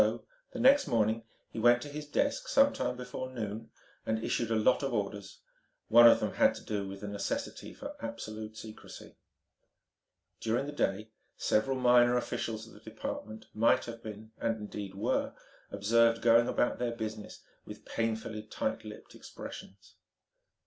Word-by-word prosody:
So, -, -, 0 dB, 0.3 s
the 255 Hz, -, -6 dB
next 275 Hz, +4 st, +6 dB
morning, 115 Hz, 0 st, +1 dB, 0.3 s
he -, -, -5 dB
went 120 Hz, +1 st, +5 dB
to -, -, -7 dB
his 150 Hz, +1 st, -7 dB
desk 285 Hz, -, 0 dB
some 280 Hz, -, +4 dB
time 125 Hz, -, -2 dB
before 125 Hz, +1 st, -6 dB
noon, 110 Hz, -3 st, -5 dB, 0.3 s
and 110 Hz, -, 0 dB
issued 115 Hz, -, -1 dB
a 115 Hz, -, +1 dB
lot 110 Hz, +4 st, +3 dB
of 135 Hz, -3 st, -1 dB
orders. 100 Hz, -1 st, -4 dB, 0.5 s
One 120 Hz, +1 st, +9 dB
of 115 Hz, -, +7 dB
them -, -, -2 dB
had -, -, +4 dB
to -, -, -10 dB
do 100 Hz, -2 st, -3 dB
with 95 Hz, 0 st, -8 dB
the 105 Hz, -, -5 dB
necessity 100 Hz, -1 st, -4 dB
for -, -, -8 dB
absolute 110 Hz, 0 st, -6 dB
secrecy. 110 Hz, -1 st, -11 dB, 1.2 s
During 115 Hz, +4 st, 0 dB
the 145 Hz, -, -5 dB
day 110 Hz, -6 st, -1 dB, 0.3 s
several 130 Hz, +5 st, +1 dB
minor 125 Hz, -1 st, +5 dB
officials 110 Hz, -2 st, -3 dB
of 115 Hz, -, -15 dB
the -, -, -14 dB
department 110 Hz, +1 st, -7 dB
might 115 Hz, +2 st, +3 dB
have 115 Hz, -1 st, -8 dB
been, 110 Hz, -1 st, -9 dB
and 115 Hz, -1 st, 0 dB
indeed 105 Hz, -2 st, -7 dB
were, 100 Hz, -, -1 dB, 0.3 s
observed 115 Hz, +2 st, +3 dB
going 115 Hz, 0 st, +6 dB
about 120 Hz, -, 0 dB
their 120 Hz, -1 st, -1 dB
business 110 Hz, -2 st, -6 dB, 0.2 s
with -, -, -11 dB
painfully 110 Hz, -1 st, -2 dB
tight 110 Hz, -, -3 dB
lipped -, -, -11 dB
expressions. 95 Hz, -1 st, -11 dB
115 Hz, 165 wpm, -31 LUFS, 105-120 Hz, 1.2 s, One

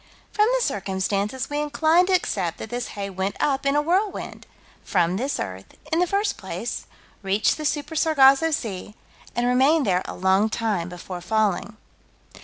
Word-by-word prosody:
From 425 Hz, 0 st, +3 dB
the -, -, 0 dB
circumstances 200 Hz, +2 st, -1 dB
we 290 Hz, 0 st, -2 dB
incline 315 Hz, +4 st, +3 dB
to 380 Hz, -, +1 dB
accept 190 Hz, -, 0 dB
that 220 Hz, -, -8 dB
this 245 Hz, 0 st, -3 dB
hay 200 Hz, -1 st, -3 dB
went 190 Hz, +1 st, -2 dB
up, 275 Hz, -1 st, +1 dB
in 275 Hz, -, +2 dB
a 295 Hz, -, +3 dB
whirlwind, 380 Hz, +6 st, -1 dB, 0.4 s
from 180 Hz, -1 st, +1 dB
this 270 Hz, +6 st, -2 dB
earth, 95 Hz, -1 st, -6 dB, 0.2 s
in 325 Hz, -, +2 dB
the 360 Hz, -, +3 dB
first 405 Hz, +3 st, 0 dB
place, -, -, -5 dB, 0.3 s
reached 195 Hz, +1 st, +1 dB
the 305 Hz, -, -6 dB
Super 295 Hz, +1 st, -2 dB
Sargasso 305 Hz, -1 st, +5 dB
Sea, 210 Hz, -8 st, -4 dB, 0.4 s
and 240 Hz, +1 st, +1 dB
remained 270 Hz, +5 st, +3 dB
there 185 Hz, -2 st, +2 dB
a -, -, -6 dB
long 190 Hz, +3 st, +2 dB
time 210 Hz, -6 st, -1 dB
before 180 Hz, 0 st, -7 dB
falling. 215 Hz, +1 st, 0 dB
240 Hz, 170 wpm, -24 LUFS, 195-300 Hz, 0.4 s, Sargasso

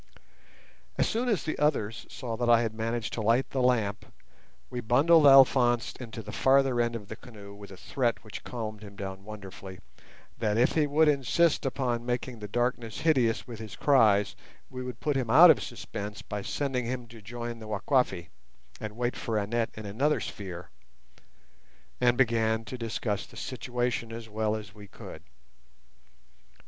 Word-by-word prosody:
As -, -, +2 dB
soon 240 Hz, +3 st, -1 dB
as 210 Hz, -6 st, +1 dB
the 155 Hz, -, -3 dB
others 120 Hz, -7 st, 0 dB
saw 120 Hz, -4 st, -5 dB
that 120 Hz, -1 st, 0 dB
I 120 Hz, 0 st, +6 dB
had 110 Hz, -1 st, -2 dB
managed 115 Hz, 0 st, -3 dB
to 115 Hz, -, -2 dB
light 115 Hz, +5 st, +2 dB
the 130 Hz, -, -1 dB
lamp, 110 Hz, -5 st, 0 dB, 0.6 s
we 125 Hz, -, -5 dB
bundled 145 Hz, +7 st, +5 dB
Alphonse 130 Hz, -3 st, +5 dB
into 115 Hz, -3 st, -7 dB
the 105 Hz, -, -8 dB
farther 135 Hz, -1 st, +3 dB
end 120 Hz, 0 st, -1 dB
of 105 Hz, -3 st, -7 dB
the 110 Hz, -, -7 dB
canoe 105 Hz, -4 st, -12 dB
with 100 Hz, 0 st, -12 dB
a 95 Hz, -, -11 dB
threat 120 Hz, +2 st, -1 dB
which 110 Hz, -, -9 dB
calmed 110 Hz, -4 st, -6 dB
him 100 Hz, -2 st, -11 dB
down 95 Hz, -1 st, -7 dB
wonderfully, 95 Hz, -2 st, -9 dB, 0.6 s
that 105 Hz, -2 st, 0 dB
if 120 Hz, -, +4 dB
he 155 Hz, -2 st, +2 dB
would 155 Hz, +2 st, +3 dB
insist 150 Hz, +2 st, +2 dB
upon 125 Hz, -3 st, -1 dB
making 120 Hz, 0 st, -3 dB
the 105 Hz, -, -6 dB
darkness 120 Hz, -1 st, -2 dB
hideous 130 Hz, -8 st, +2 dB
with 115 Hz, -3 st, -9 dB
his 110 Hz, -2 st, -8 dB
cries 110 Hz, -8 st, +3 dB, 0.4 s
we 130 Hz, -1 st, -6 dB
would 125 Hz, -2 st, -6 dB
put 150 Hz, -2 st, -1 dB
him 130 Hz, -4 st, -1 dB
out 160 Hz, +8 st, +9 dB
of -, -, +1 dB
suspense 105 Hz, +1 st, -7 dB
by 105 Hz, -1 st, -5 dB
sending 130 Hz, +2 st, -2 dB
him 125 Hz, 0 st, -4 dB
to 115 Hz, -1 st, -14 dB
join 120 Hz, +2 st, -6 dB
the 110 Hz, -, -9 dB
Wakwafi 105 Hz, -, 0 dB, 0.5 s
and 110 Hz, 0 st, -7 dB
wait 120 Hz, 0 st, -1 dB
for 115 Hz, -3 st, -2 dB
Annette 115 Hz, +3 st, -1 dB
in 110 Hz, -, -8 dB
another 130 Hz, +10 st, +1 dB
sphere, 90 Hz, -3 st, -7 dB, 1.3 s
and 120 Hz, -1 st, +3 dB
began 115 Hz, -3 st, +2 dB
to 130 Hz, -, -6 dB
discuss 115 Hz, -3 st, -3 dB
the -, -, -15 dB
situation 120 Hz, -2 st, -3 dB
as 115 Hz, 0 st, -7 dB
well 110 Hz, 0 st, -1 dB
as 105 Hz, -2 st, -8 dB
we 105 Hz, -1 st, -13 dB
could. 80 Hz, -, -11 dB
115 Hz, 175 wpm, -28 LUFS, 105-130 Hz, 1.3 s, out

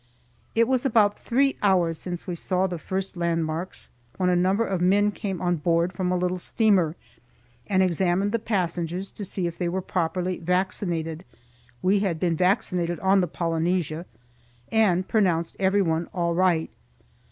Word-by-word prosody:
It 230 Hz, 0 st, +4 dB
was 255 Hz, -1 st, +1 dB
about 220 Hz, -6 st, +3 dB
three 270 Hz, +3 st, +1 dB
hours 175 Hz, -5 st, +2 dB
since 175 Hz, -2 st, -5 dB
we 180 Hz, -, -4 dB
saw 185 Hz, +2 st, 0 dB
the 175 Hz, -3 st, -3 dB
first 190 Hz, +3 st, -4 dB
landmarks, 165 Hz, 0 st, -2 dB, 0.3 s
when 185 Hz, -1 st, +1 dB
a -, -, +3 dB
number 190 Hz, +5 st, +2 dB
of 190 Hz, -4 st, -2 dB
men 205 Hz, +3 st, +3 dB
came 195 Hz, -4 st, -4 dB
on 175 Hz, -1 st, 0 dB
board, 170 Hz, +3 st, +1 dB
from 180 Hz, 0 st, -1 dB
a 180 Hz, -, +1 dB
little 180 Hz, 0 st, -1 dB
steamer, 185 Hz, -6 st, +2 dB, 0.7 s
and 190 Hz, -2 st, +3 dB
examined 185 Hz, +2 st, +1 dB
the 230 Hz, -, 0 dB
passengers 180 Hz, -3 st, -2 dB
to 210 Hz, -, -7 dB
see 190 Hz, -1 st, -3 dB
if 170 Hz, -1 st, -4 dB
they 175 Hz, -2 st, 0 dB
were 185 Hz, +2 st, -1 dB
properly 180 Hz, 0 st, -2 dB
vaccinated 175 Hz, -2 st, -1 dB, 0.6 s
(we 195 Hz, +2 st, +3 dB
had 185 Hz, -5 st, -1 dB
been 170 Hz, -1 st, +1 dB
vaccinated 180 Hz, -2 st, +1 dB
on 195 Hz, 0 st, +4 dB
the 180 Hz, -, 0 dB
"Polynesia"), 165 Hz, 0 st, -1 dB, 0.6 s
and 190 Hz, -5 st, +2 dB
pronounced 175 Hz, -6 st, +1 dB
everyone 190 Hz, -4 st, +1 dB
all 170 Hz, -1 st, 0 dB
right. 170 Hz, -2 st, +2 dB
180 Hz, 160 wpm, -25 LUFS, 170-195 Hz, 0.7 s, It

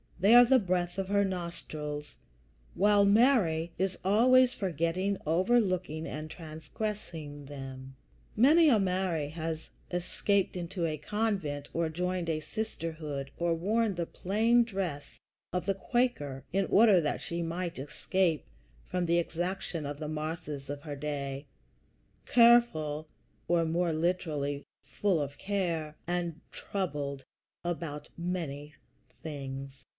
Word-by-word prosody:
They 200 Hz, +5 st, +5 dB
are 245 Hz, 0 st, +10 dB
the 260 Hz, +2 st, +5 dB
breath 180 Hz, -3 st, -1 dB
of 190 Hz, -, -1 dB
her 200 Hz, 0 st, +3 dB
nostrils, 155 Hz, -5 st, -5 dB, 0.6 s
while 205 Hz, +1 st, +5 dB
Mary 200 Hz, -7 st, +4 dB
is 190 Hz, 0 st, 0 dB
always 250 Hz, +6 st, +5 dB
forgetting, 185 Hz, +2 st, -1 dB
overlooking, 185 Hz, -2 st, +1 dB
and 155 Hz, +1 st, -5 dB
transgressing 160 Hz, -2 st, -6 dB
them. 135 Hz, -1 st, -8 dB, 0.4 s
Many 305 Hz, +8 st, +6 dB
a 230 Hz, -6 st, +5 dB
Mary 180 Hz, -5 st, 0 dB
has 160 Hz, 0 st, -4 dB, 0.2 s
escaped 190 Hz, +3 st, 0 dB
into 175 Hz, 0 st, -3 dB
a 155 Hz, -2 st, -1 dB
convent, 195 Hz, -9 st, -2 dB
or 165 Hz, -1 st, 0 dB
joined 180 Hz, +1 st, -2 dB
a 155 Hz, -1 st, 0 dB
sisterhood, 155 Hz, -8 st, -4 dB
or 170 Hz, -1 st, +1 dB
worn 210 Hz, +4 st, +1 dB
the 170 Hz, -1 st, -1 dB
plain 225 Hz, +8 st, +2 dB
dress 190 Hz, -10 st, -4 dB, 0.3 s
of 180 Hz, -, -1 dB
the 195 Hz, -, +2 dB
Quaker 190 Hz, -, -1 dB
in 195 Hz, 0 st, +2 dB
order 205 Hz, -4 st, +6 dB
that 150 Hz, -, -1 dB
she 170 Hz, 0 st, -3 dB
might 170 Hz, -1 st, -3 dB
escape 160 Hz, +4 st, 0 dB, 0.4 s
from 180 Hz, -1 st, -1 dB
the 170 Hz, +1 st, +3 dB
exaction 175 Hz, -1 st, -3 dB
of 145 Hz, 0 st, -5 dB
the 155 Hz, -, -4 dB
Marthas 155 Hz, -2 st, -4 dB
of 145 Hz, 0 st, -4 dB
her 145 Hz, -1 st, -6 dB
day, 140 Hz, -1 st, -4 dB, 0.8 s
"careful 205 Hz, -11 st, +4 dB, 0.4 s
[or, 170 Hz, -1 st, +3 dB
more 170 Hz, +1 st, +1 dB
literally, 155 Hz, -4 st, -1 dB, 0.2 s
full 195 Hz, -5 st, 0 dB
of 140 Hz, 0 st, -5 dB
care] 170 Hz, -6 st, -1 dB
and 175 Hz, -2 st, -2 dB
troubled 145 Hz, -8 st, -3 dB, 0.4 s
about 160 Hz, -4 st, -4 dB
many 155 Hz, -4 st, -4 dB, 0.5 s
things." 135 Hz, -3 st, -6 dB
170 Hz, 125 wpm, -30 LUFS, 150-195 Hz, 0.8 s, are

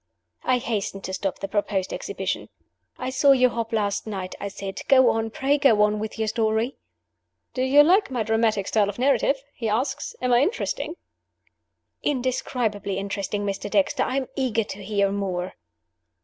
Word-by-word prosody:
I 255 Hz, -, +3 dB
hastened 205 Hz, -5 st, -3 dB
to 190 Hz, -, -5 dB
stop 195 Hz, 0 st, -2 dB
the 195 Hz, -, -4 dB
proposed 200 Hz, -2 st, -1 dB
exhibition. -, -, -3 dB, 0.5 s
"I 255 Hz, 0 st, -3 dB
saw 275 Hz, +1 st, +5 dB
you 255 Hz, -1 st, +4 dB
hop 230 Hz, -1 st, -3 dB
last 210 Hz, -1 st, -1 dB
night," 190 Hz, -3 st, -4 dB
I -, -, -3 dB
said. 195 Hz, 0 st, -6 dB
"Go 260 Hz, -2 st, +6 dB
on! 225 Hz, 0 st, -1 dB
pray 275 Hz, +5 st, +1 dB
go 225 Hz, -7 st, +5 dB
on 210 Hz, 0 st, +2 dB
with 215 Hz, +1 st, -5 dB
your 220 Hz, 0 st, -1 dB
story! 220 Hz, +3 st, 0 dB, 0.8 s
"Do 255 Hz, -, -2 dB
you 275 Hz, +3 st, +6 dB
like 375 Hz, +5 st, +4 dB
my 245 Hz, -4 st, -1 dB
dramatic 220 Hz, -2 st, +1 dB
style 210 Hz, -2 st, +2 dB
of 205 Hz, -, -6 dB
narrative?" 275 Hz, +1 st, +2 dB
he 225 Hz, -2 st, -3 dB
asked. 265 Hz, +6 st, -1 dB
"Am 250 Hz, -1 st, +1 dB
I 240 Hz, -, +6 dB
interesting?" 350 Hz, -1 st, -1 dB, 1.1 s
"Indescribably 245 Hz, -7 st, -1 dB
interesting, 200 Hz, +1 st, -3 dB
Mr. 200 Hz, 0 st, -3 dB
Dexter. 285 Hz, +2 st, +2 dB
I 260 Hz, +1 st, 0 dB
am 265 Hz, -2 st, -1 dB
eager 240 Hz, -4 st, +1 dB
to 200 Hz, -1 st, -8 dB
hear 200 Hz, -1 st, +1 dB
more." 185 Hz, -3 st, -2 dB
225 Hz, 170 wpm, -24 LUFS, 200-260 Hz, 1.1 s, Go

